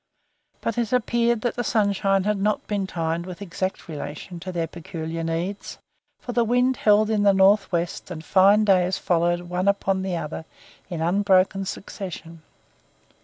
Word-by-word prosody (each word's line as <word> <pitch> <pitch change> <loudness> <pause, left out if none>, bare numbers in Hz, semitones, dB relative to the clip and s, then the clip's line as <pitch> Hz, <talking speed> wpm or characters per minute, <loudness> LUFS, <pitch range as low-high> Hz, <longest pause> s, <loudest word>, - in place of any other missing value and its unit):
But 230 +1 -2
it 230 -2 -1
appeared 235 -1 +1
that 240 - -1
the 245 - -2
sunshine 200 -3 +1
had 210 0 0
not 210 +1 0
been 200 -2 -2
timed 165 0 -2
with 180 -1 -8
exact 190 -1 -4
relation 155 +3 -7
to 185 +2 -6
their 170 -2 -1
peculiar 165 0 -6
needs, 170 +5 -4 0.4
for 245 - -6
the 240 0 +2
wind 245 +3 +2
held 215 +1 +3
in 215 -2 +1
the 200 -1 +4
north 195 +2 +4
west 170 0 -2
and 160 -3 -7
fine 200 +2 +5
days 185 -1 +3
followed 175 -1 +1
one 180 +2 -3
upon 195 -1 +1
the 190 -2 -2
other 160 0 -5 0.4
in 170 -3 -4
unbroken 190 +2 +2
succession. 175 -4 -7
190 Hz, 165 wpm, -24 LUFS, 170-210 Hz, 0.4 s, fine